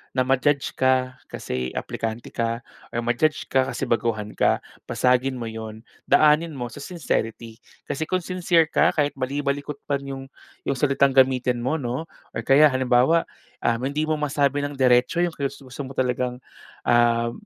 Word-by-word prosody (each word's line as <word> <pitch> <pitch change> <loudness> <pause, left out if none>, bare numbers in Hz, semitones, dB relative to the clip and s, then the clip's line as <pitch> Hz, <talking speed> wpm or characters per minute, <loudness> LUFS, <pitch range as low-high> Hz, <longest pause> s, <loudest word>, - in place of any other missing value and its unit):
na 130 - +3
ma-judge 135 +2 +1
ka 130 0 +2
kasi 65 0 -4
aplikante 115 +1 -4
ka 115 +1 -2 0.3
or 115 - -3
ma-judge 120 +6 +1
ka 130 -1 +3
kasi - - -4
baguhan 110 -3 -1
ka, - - +2 0.3
basagin 125 +1 +2
mo 120 - -5
yun. 110 0 -7 0.3
Daanin 155 +1 +4
mo 125 -2 -4
sa 145 - -9
sincerity 115 - -3 0.3
kasi 155 +3 -3
kung 185 -1 0
sincere 175 -2 +2
ka - - +3
kahit 145 -1 +1
bali-balikot 140 +2 -2
man 140 -1 -1
yung 135 -1 -5 0.4
yung - - +1
salitang 140 -1 +3
gamitin 130 -2 +3
mo, 130 +6 0
'no, 130 +4 -4 0.3
or - - -3
kaya 135 +6 +6
halimbawa, 130 +5 +3 0.3
ah, 115 - +2
hindi 140 +5 -2
mo 155 - +2
masabi 145 -1 0
ng 145 - -4
diretso 125 +6 +4
yung 175 -2 0
gusto 135 -1 -5
mo 135 - -9
talagang, 125 -1 -1 0.5
um, 120 0 +3
130 Hz, 160 wpm, -24 LUFS, 120-145 Hz, 0.5 s, kaya